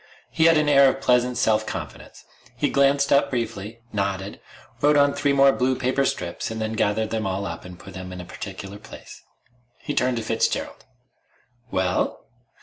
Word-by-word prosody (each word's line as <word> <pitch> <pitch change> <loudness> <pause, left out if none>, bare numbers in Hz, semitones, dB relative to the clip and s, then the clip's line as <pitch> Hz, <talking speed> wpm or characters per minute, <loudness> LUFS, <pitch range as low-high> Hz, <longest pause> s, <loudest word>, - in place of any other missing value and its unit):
He 160 - +2
had 165 -1 +6
an 155 -1 +2
air 140 -2 +6
of 135 - -3
pleasant 125 -1 +2
self 110 -1 +2
confidence. 75 -8 -8 0.3
He - - 0
glanced 140 0 +3
up 140 - +3
briefly, 115 -2 -4
nodded, 100 -1 -3 0.4
wrote 145 +1 +4
on 140 0 +4
three 145 - +1
more 140 0 +5
blue 130 0 0
paper 130 +2 0
strips, 90 -8 -3
and 110 0 -5
then 110 0 -2
gathered 110 0 0
them 110 -3 -1
all 95 +1 -2
up 85 -2 -6
and 90 -1 -10
put 95 +1 -12
them 95 0 -8
in 90 - -7
a 90 - -7
particular 95 +2 -8
place. 110 - -12 0.6
He - - -5
turned 125 -1 +1
to 115 - -3
Fitzgerald. 115 +1 -2 0.8
"Well?" 95 -3 -1
110 Hz, 180 wpm, -23 LUFS, 95-135 Hz, 0.8 s, had